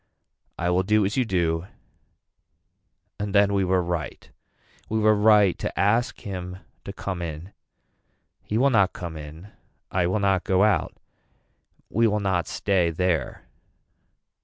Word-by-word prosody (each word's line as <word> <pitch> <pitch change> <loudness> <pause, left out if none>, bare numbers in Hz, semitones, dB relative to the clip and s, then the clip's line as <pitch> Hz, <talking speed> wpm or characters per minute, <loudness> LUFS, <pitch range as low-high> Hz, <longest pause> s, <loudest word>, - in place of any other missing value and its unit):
I 90 +1 0
will 90 +1 +2
do 105 +2 +2
as 100 - -2
you 130 -2 +1
do 85 -3 -1 1.5
and 100 0 -3
then 100 0 +4
we 100 -1 +2
were 90 -1 +1
right. 85 -2 -5 0.6
We 110 - -1
were 110 0 +4
right 105 -2 +4
to - - -4
ask 115 +5 +1
him 90 -2 -6 0.3
to - - -5
come 100 -2 -5
in. 85 +3 -7 0.9
He 105 - -3
will 135 +3 +3
not 100 -5 +3
come 85 -2 -7
in. 80 +5 -10 0.4
I 90 -2 +1
will 95 +4 0
not 95 -2 +1
go 95 +1 +2
out. 105 -2 +1 1.0
We 115 +2 +3
will 105 0 0
not 95 -4 0
stay 95 -4 +1
there. 85 -4 -1
95 Hz, 145 wpm, -24 LUFS, 90-105 Hz, 1.5 s, then